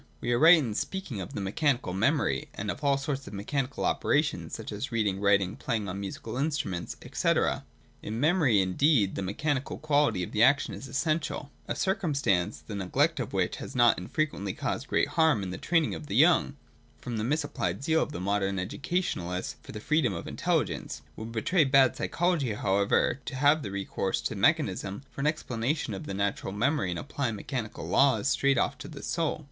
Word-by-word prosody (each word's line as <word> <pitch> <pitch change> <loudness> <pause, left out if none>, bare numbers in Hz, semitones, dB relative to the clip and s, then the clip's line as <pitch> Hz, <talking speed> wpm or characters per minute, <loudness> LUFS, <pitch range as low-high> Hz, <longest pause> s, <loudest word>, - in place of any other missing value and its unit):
We 120 - -2
are 120 - +2
right 165 +3 +9
in 125 -9 -1
speaking 145 - -4
of 90 - -8
mechanical 120 - 0
memory, 100 - +1
and 105 0 -2
all 140 -1 +1
sorts 140 -1 -4
of 100 - -9
mechanical 130 +6 -2
operations, 150 +1 0
such 115 - -7
as 105 +6 -4
reading, 105 -4 0
writing, 100 -1 +3
playing 110 -3 -2
on 95 +1 -4
musical 105 +4 -6
instruments, 140 - -2 0.2
&c. - - +2 0.7
In 110 +2 -4
memory, 145 - +4
indeed, 100 - +2
the - - -3
mechanical 130 +8 -2
quality 145 -10 +2
of - - -6
the 105 - 0
action 140 +4 +4
is 135 - -8
essential: 150 +1 -2 0.2
a - - -2
circumstance, 145 - 0
the 110 - -7
neglect 95 -3 +1
of - - -3
which - - 0
has - - -8
not 120 -5 +5
unfrequently 100 - -2
caused - - -3
great - - +2
harm 160 - +3
in 95 - -4
the 90 - -6
training 165 -3 +1
of 150 - -7
the 115 - +1
3'oung, 170 -4 +3 0.4
from 120 -2 -5
the 105 - -1
misapplied 135 - -1
zeal 160 +2 +2
of 150 - -3
modern 100 +1 0
educationalists 95 - -2
for - - -11
the 105 - -6
freedom 140 -2 +1
of 85 - -6
intelligence. - - -1
It - - -11
would 110 +1 -6
betray 155 +10 +2
bad 135 -2 +4
psychology, 165 -9 0
however, 100 +5 +1
to 135 - -5
have 145 +3 +3
recourse 100 -1 -2
to - - -3
mechanism 105 - +1
for - - -6
an 145 - +1
explanation 130 -4 -1
of 95 - -6
the 100 - -4
nature 100 0 -1
of 95 - -4
memory, 115 - +1
and 85 - -2
to - - -4
apply 140 -4 -2
mechanical 110 +1 -5
laws 130 -7 +3
straight 140 -1 +2
off - - 0
to - - -7
the 145 -3 -10
soul. 165 -2 -1
120 Hz, 190 wpm, -28 LUFS, 100-150 Hz, 0.7 s, right